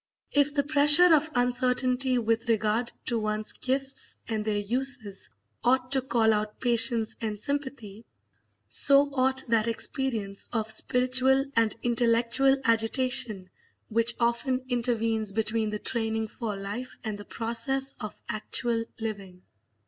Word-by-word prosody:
If 285 Hz, 0 st, +1 dB
the 285 Hz, -, +2 dB
pressure 300 Hz, +4 st, +6 dB
of 310 Hz, 0 st, +2 dB
uncertainty 250 Hz, +1 st, +1 dB
with 230 Hz, 0 st, -1 dB
regard 225 Hz, +2 st, 0 dB
to 235 Hz, -2 st, -1 dB
one's 215 Hz, 0 st, -3 dB
gifts 270 Hz, +1 st, -4 dB
and 220 Hz, -2 st, -2 dB
their 210 Hz, -1 st, -1 dB
uses 220 Hz, -, -1 dB, 0.3 s
ought 255 Hz, +1 st, +1 dB
to 270 Hz, -1 st, +2 dB
call 235 Hz, -3 st, +2 dB
out 210 Hz, 0 st, -3 dB
patience 235 Hz, -2 st, +2 dB
and 215 Hz, -2 st, -4 dB
sympathy, 260 Hz, -6 st, -5 dB, 0.6 s
so 280 Hz, -, +5 dB
ought 265 Hz, 0 st, +2 dB
that 225 Hz, -1 st, +2 dB
experience 230 Hz, -4 st, -3 dB
of 220 Hz, -2 st, 0 dB
spiritual 255 Hz, +3 st, +1 dB
and 225 Hz, -1 st, +2 dB
intellectual 240 Hz, +3 st, +3 dB
agitation 225 Hz, -4 st, +1 dB, 0.4 s
which 230 Hz, +2 st, +1 dB
often 240 Hz, +2 st, -1 dB
intervenes 230 Hz, -4 st, -1 dB
between 220 Hz, 0 st, 0 dB
the 210 Hz, -, -3 dB
training 220 Hz, -1 st, -2 dB
for 215 Hz, -2 st, -5 dB
life 205 Hz, +6 st, -7 dB
and 215 Hz, -3 st, -5 dB
the 205 Hz, -, -10 dB
process 265 Hz, +4 st, -3 dB
of 215 Hz, -3 st, -8 dB
actual 230 Hz, +2 st, -1 dB, 0.2 s
living. 200 Hz, -5 st, -7 dB
235 Hz, 130 wpm, -27 LUFS, 220-260 Hz, 0.6 s, pressure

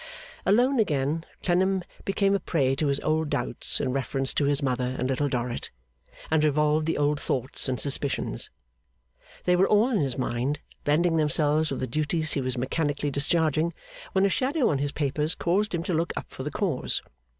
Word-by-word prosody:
Alone 245 Hz, +6 st, +4 dB
again, 150 Hz, -4 st, 0 dB, 0.2 s
Clennam 190 Hz, +1 st, +2 dB, 0.2 s
became 195 Hz, 0 st, +2 dB
a 200 Hz, -, +2 dB
prey 135 Hz, -8 st, +1 dB
to 150 Hz, +2 st, 0 dB
his 140 Hz, 0 st, +1 dB
old 155 Hz, 0 st, 0 dB
doubts -, -, -1 dB
in 130 Hz, -, -1 dB
reference 135 Hz, 0 st, -1 dB
to 145 Hz, -, +1 dB
his 145 Hz, +1 st, +1 dB
mother 125 Hz, -1 st, -1 dB
and 125 Hz, -, -1 dB
Little 135 Hz, +2 st, 0 dB
Dorrit, 120 Hz, -2 st, -3 dB, 0.6 s
and 160 Hz, -1 st, +3 dB
revolved 150 Hz, +1 st, +2 dB
the 165 Hz, -, 0 dB
old 145 Hz, 0 st, +1 dB
thoughts 130 Hz, +1 st, -2 dB
and 125 Hz, -2 st, -1 dB
suspicions. 140 Hz, +2 st, 0 dB, 0.9 s
They 180 Hz, -, +3 dB
were 185 Hz, +2 st, +4 dB
all 215 Hz, +5 st, +4 dB
in 220 Hz, -, +2 dB
his 135 Hz, -4 st, -1 dB
mind, 130 Hz, +3 st, -1 dB, 0.3 s
blending 165 Hz, +3 st, +3 dB
themselves 155 Hz, 0 st, +2 dB
with 135 Hz, -, -3 dB
the -, -, 0 dB
duties 155 Hz, +4 st, -1 dB
he 140 Hz, -, 0 dB
was 130 Hz, 0 st, -2 dB
mechanically 145 Hz, +3 st, -1 dB
discharging, 160 Hz, +3 st, +1 dB, 0.4 s
when 190 Hz, 0 st, +3 dB
a -, -, +3 dB
shadow 265 Hz, -, +1 dB
on 140 Hz, -, 0 dB
his 145 Hz, 0 st, -1 dB
papers 150 Hz, +2 st, 0 dB
caused 195 Hz, +3 st, 0 dB
him 165 Hz, -, -2 dB
to 180 Hz, -, -2 dB
look 165 Hz, +1 st, 0 dB
up -, -, -4 dB
for -, -, -8 dB
the 145 Hz, -, -3 dB
cause. 160 Hz, -4 st, -1 dB
150 Hz, 185 wpm, -26 LUFS, 135-170 Hz, 0.9 s, Alone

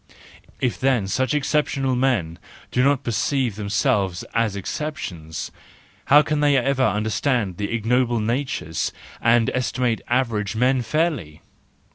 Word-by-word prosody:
If 125 Hz, -3 st, -1 dB
then 130 Hz, -6 st, +2 dB
such 130 Hz, +8 st, 0 dB
exceptional 140 Hz, -2 st, 0 dB
men 115 Hz, -11 st, 0 dB, 0.3 s
do 125 Hz, -, +2 dB
not 140 Hz, 0 st, +2 dB
perceive 120 Hz, 0 st, 0 dB
themselves 100 Hz, -3 st, 0 dB
as 115 Hz, -3 st, +1 dB
exceptions, 90 Hz, -, -5 dB, 0.5 s
how 145 Hz, +2 st, +7 dB
can 150 Hz, -1 st, -1 dB
they 145 Hz, -1 st, +4 dB
ever 135 Hz, +1 st, +1 dB
understand 110 Hz, -3 st, 0 dB
the 100 Hz, -1 st, -3 dB
ignoble 120 Hz, +1 st, +1 dB
natures 115 Hz, -, -2 dB, 0.3 s
and 115 Hz, 0 st, +3 dB
estimate 125 Hz, -2 st, -1 dB
average 115 Hz, -5 st, 0 dB
men 125 Hz, +3 st, +2 dB
fairly! 120 Hz, -, -1 dB
120 Hz, 120 wpm, -22 LUFS, 105-135 Hz, 0.5 s, how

